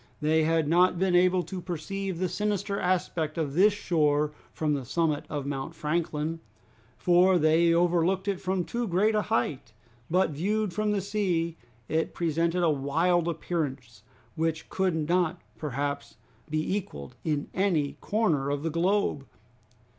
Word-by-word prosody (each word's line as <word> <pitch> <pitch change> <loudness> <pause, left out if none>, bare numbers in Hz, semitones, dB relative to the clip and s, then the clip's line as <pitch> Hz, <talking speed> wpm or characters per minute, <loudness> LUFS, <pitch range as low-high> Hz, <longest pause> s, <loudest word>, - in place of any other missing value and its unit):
They 155 +1 +2
had 160 -1 +2
not 180 +3 +4
been 185 0 +1
able 180 0 +4
to 180 +2 -6
perceive 185 +2 -4
the 185 +1 0
sinister 200 +1 -1
aspect 170 -3 -1
of 150 -4 -1
this 195 +7 +5
shore 150 -7 +1 0.2
from 155 -2 -1
the 140 -2 -2
summit 155 +3 0
of 145 -2 -3
Mount 140 +3 -4
Franklin, 160 0 -2 0.6
for 180 +1 +4
they 165 +1 +4
overlooked 175 +3 +2
it 195 -2 -1
from 185 -1 0
too 240 0 -2
great 200 +5 +2
a 210 - +2
height, 130 - -2 0.4
but 180 -1 +2
viewed 200 +6 -1
from 215 +2 0
the 205 -1 +1
sea 180 -5 -1 0.3
it 160 +1 -1
presented 170 +1 0
a 165 - +4
wild 165 +5 +1
appearance 140 - -3 0.3
which 160 0 -2
could 170 -5 0
not 175 -1 +1 0.2
perhaps 140 -1 -3 0.3
be 155 +5 -1
equaled 75 - -6
in 150 -3 -1
any 175 -7 +1
corner 165 -11 +1
of 145 0 -2
the 165 - -1
globe. 170 -4 0
170 Hz, 150 wpm, -28 LUFS, 150-185 Hz, 0.6 s, this